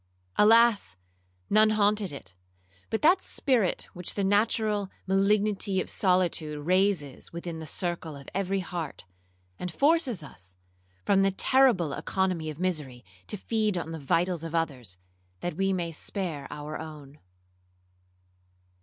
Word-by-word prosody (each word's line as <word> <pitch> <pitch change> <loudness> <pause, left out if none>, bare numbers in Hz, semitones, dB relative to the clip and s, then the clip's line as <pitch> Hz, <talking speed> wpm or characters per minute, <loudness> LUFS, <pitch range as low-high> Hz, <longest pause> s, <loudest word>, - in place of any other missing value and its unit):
Alas! 220 - +5 0.5
none 215 +1 +5
haunted 210 -3 +2
it, 95 -10 -9 0.6
but 220 - -2
that 360 +5 +5
spirit 245 -10 +1
which 180 -1 -2
the 200 - 0
natural 205 0 +1 0.2
malignity 200 0 +2
of - - -3
solitude 170 -6 +1
raises 185 -6 +1
within 170 -1 -6
the 160 - -7
circle 170 -1 -3
of 140 -1 -12
every 195 0 0
heart, 170 - -6 0.5
and 180 - -4
forces 275 - +2
us, 95 -9 -10 0.5
from 195 -1 +4
the 195 - +4
terrible 195 - +3
economy 185 -3 -1
of 155 0 -8
misery, 150 - -3 0.2
to 210 - -2
feed 215 -1 0
on 165 -1 -4
the 165 - -5
vitals 170 +4 0
of 165 0 -5
others, 130 - -2 0.4
that 175 - -3
we 195 +2 +1
may 175 -3 -1
spare 160 -3 -3
our 150 +1 -6
own. 150 -2 -10
180 Hz, 135 wpm, -28 LUFS, 155-205 Hz, 0.6 s, Alas